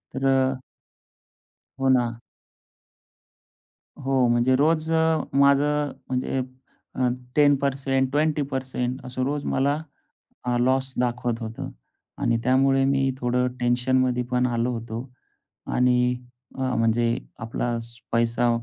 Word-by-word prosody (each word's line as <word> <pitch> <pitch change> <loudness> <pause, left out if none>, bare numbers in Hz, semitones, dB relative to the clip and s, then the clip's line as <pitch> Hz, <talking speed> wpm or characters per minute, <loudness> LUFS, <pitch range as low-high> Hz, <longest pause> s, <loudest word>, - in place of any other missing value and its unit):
तर 135 - -2
अ 135 0 +3 1.3
हो 135 0 +2
ना. 120 -3 +2 1.8
हो. 130 -2 +2
म्हणजे 120 +2 +3
रोज 155 +3 +2
अ, 160 -1 +3
माझं 145 +1 +3 0.2
म्हणजे 130 +1 -1 0.6
अ, 130 - +1 0.3
10% 135 -2 +2
20% 135 -4 -1
असं 130 0 -3
रोज 145 +1 -2
मला 140 +3 +1 0.8
लॉस 130 +1 +1
दाखवत 120 -1 -1
होतं. 115 0 -6 0.5
आणि 115 - +1
त्यामुळे 135 +1 +3
मी 135 0 +2
थोडं 125 0 +1
टेन्शनमध्ये 125 +1 +2
पण 125 0 +2
आलो 120 0 0
होतो. 115 +2 -5 0.6
आणि 125 0 +2 0.6
अ, - - -4 0.2
म्हणजे 115 +1 +2 0.2
आपला 120 +1 -2 0.4
पैसा 115 +1 +2
130 Hz, 105 wpm, -24 LUFS, 120-135 Hz, 1.8 s, अ